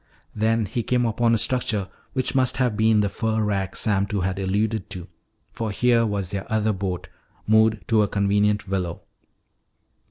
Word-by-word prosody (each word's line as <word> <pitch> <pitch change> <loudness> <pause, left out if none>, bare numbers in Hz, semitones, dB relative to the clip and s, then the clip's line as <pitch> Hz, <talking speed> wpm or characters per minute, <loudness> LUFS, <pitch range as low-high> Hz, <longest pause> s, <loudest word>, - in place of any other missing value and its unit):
Then 110 +1 +1
he 110 +5 -2
came 125 +1 +1
upon 115 +1 +2
a - - +2
structure 110 -4 0 0.3
which 130 -2 -1
must 130 -2 +2
have 125 -4 +1
been 110 0 +3
the 105 - +1
fur 110 +2 -1
rack 95 -2 -1
Sam 100 -2 +1
Two 100 -1 -2
had 95 +1 -2
alluded 105 +2 -1
to, 90 -1 -7 0.4
for 115 -1 -4
here 115 +2 +2
was 100 -3 -3
their 100 +1 -5
other 110 0 +1
boat 95 -2 -4 0.4
moored 110 0 +3
to 110 -1 +4
a 105 - +2
convenient 100 +1 +1
willow. 90 -3 -3
105 Hz, 170 wpm, -23 LUFS, 100-115 Hz, 0.4 s, to